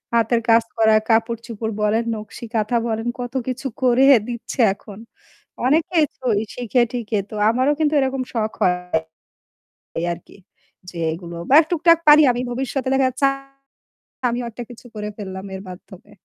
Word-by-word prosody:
হাতের 230 +1 +2
কাজ 230 0 +6
করা 220 -1 +5
কাপড়-চোপড় 225 -1 -1
বলেন, 215 +2 +2
নকশি 215 +2 -9
কাঁথা 220 +2 +1
বলেন। 225 +1 -2
কত 245 +1 -5
কিছু 260 +2 -3 0.2
করে 255 +2 +4 0.2
দিচ্ছে 240 +2 -6
এখন। 205 0 -13 0.7
অনেকেই 315 +3 +3
তো 260 - -13 0.3
শিখে-টিখে 240 -2 0
তো 215 - -8
আমারও 260 +5 +2
কিন্তু 310 -1 +1
এরকম 265 -1 0
শখ 220 -2 -1
হয়। 180 0 +3 1.2
এই 170 - -1
আরকি। 170 - -17 0.5
যে 170 - -9
এগুলো 170 0 -8
বা 285 - +7
টুকটাক 335 0 +4
পারি 300 +1 +9
আমি 245 +1 -3
ভবিষ্যতে 260 +1 -3
দেখা 265 -1 +3
যাচ্ছে 255 +2 0 1.0
আমিও 240 +1 -3
একটা 240 +2 -7
কিছু 245 +1 -13
করে 210 0 -4
ফেললাম 190 -1 -7
এর 190 - -7
মাধ্যমে। 190 +2 -13
235 Hz, 150 wpm, -21 LUFS, 215-260 Hz, 1.2 s, পারি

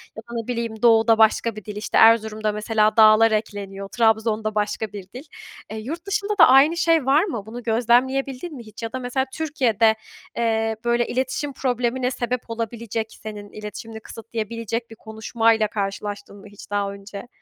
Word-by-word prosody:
Ya 220 - -7
da, 235 - -8
ne 225 - -15
bileyim, 230 -3 -4
doğuda 225 -1 +5
başka 220 0 +3
bir 215 - -9
dil, 210 - -7
işte, 210 +1 -2
Erzurum'da 220 -1 0
mesela 215 +1 +1
da'lar 220 +1 +7
ekleniyor. 200 -2 -3
Trabzon'da 220 -1 +1
başka 210 +1 -1
bir 200 -2 -7
dil. 255 +3 -8 0.5
Eee, 220 - -5
yurt 320 - -6
dışında 415 +1 -2
da 330 - +9
aynı 280 +6 +5
şey 330 -5 +2
var 285 +5 +4
mı? 235 - -4
Bunu 235 +3 -8
gözlemleyebildin 255 +6 +1
mi 240 - -9
hiç? 215 +2 -11
Ya 225 - -5
da 260 - -3
mesela 255 +1 -1
Türkiye'de, 235 -8 +2 0.4
eee, 225 -1 0
böyle, 240 0 +1
iletişim 265 +3 -2
problemine 250 0 -1
sebep 245 -1 -3
olabilecek 230 -1 -4 0.2
senin 210 -1 -8
iletişimini 215 +1 -8
kısıtlayabilecek 230 +1 -5
bir 225 - -11
konuşmayla 220 0 0
karşılaştın 200 0 -5
mı 200 - -13
hiç 205 0 -14
daha 200 -1 -1
önce? 200 +2 -10
225 Hz, 170 wpm, -22 LUFS, 215-245 Hz, 0.5 s, da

